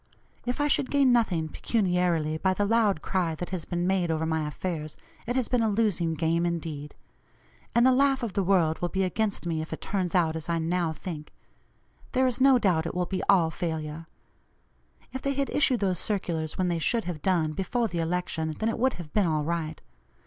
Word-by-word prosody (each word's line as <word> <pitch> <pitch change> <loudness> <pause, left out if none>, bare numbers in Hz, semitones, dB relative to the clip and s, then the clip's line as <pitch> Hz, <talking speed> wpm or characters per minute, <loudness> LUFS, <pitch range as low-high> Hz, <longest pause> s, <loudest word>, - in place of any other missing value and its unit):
If 250 +4 -1
I 290 - +2
should 275 -2 +2
gain 275 -3 +4
nothing 185 -9 +2
pecuniarily 175 -5 0
by 185 +1 +1
the 205 - +1
loud 210 -6 +2
cry 175 -4 0
that 175 +3 -6
has 180 -4 -3
been 175 -1 -2
made 185 -2 +1
over 160 0 0
my 160 -1 -1
affairs, 155 -1 -4 0.3
it 245 - -1
has 255 -3 +1
been 250 -2 +1
a 225 - +2
losing 200 -6 +1
game 165 +2 +1
indeed. 160 -4 -3 0.8
And 235 +1 +5
the 260 - +6
laugh 270 0 +3
of 220 -5 -3
the 200 - +1
world 175 -4 +2
will 175 - -1
be 190 +1 0
against 200 +1 -1
me 165 -2 -1
if 160 - -7
it - - -4
turns 185 -3 -2
out 165 -3 +2
as 160 +1 -5
I 170 - +1
now 165 0 0
think; 155 -2 -7 0.8
there 260 +1 +3
is 255 0 0
no 270 -1 +7
doubt 175 -8 +1
it - - -5
will 180 0 0
be 185 +1 -3
all 175 -5 +5
failure. 160 -1 -4 1.1
If 260 - -4
they 275 0 -1
had 275 0 -1
issued 260 -5 +2
those 185 -4 +1
circulars 170 -6 -2
when 185 - +1
they 170 -1 0
should 230 +7 +1
have 170 -4 -5
done, 165 -3 +1
before 230 +7 -1
the 170 -3 -4
election, 165 -2 -2
then 220 - 0
it 225 - -3
would 260 +2 +2
have 165 -4 -9
been 205 -4 +3
all 155 -2 0
right. 160 -1 -3
180 Hz, 215 wpm, -27 LUFS, 160-220 Hz, 1.1 s, no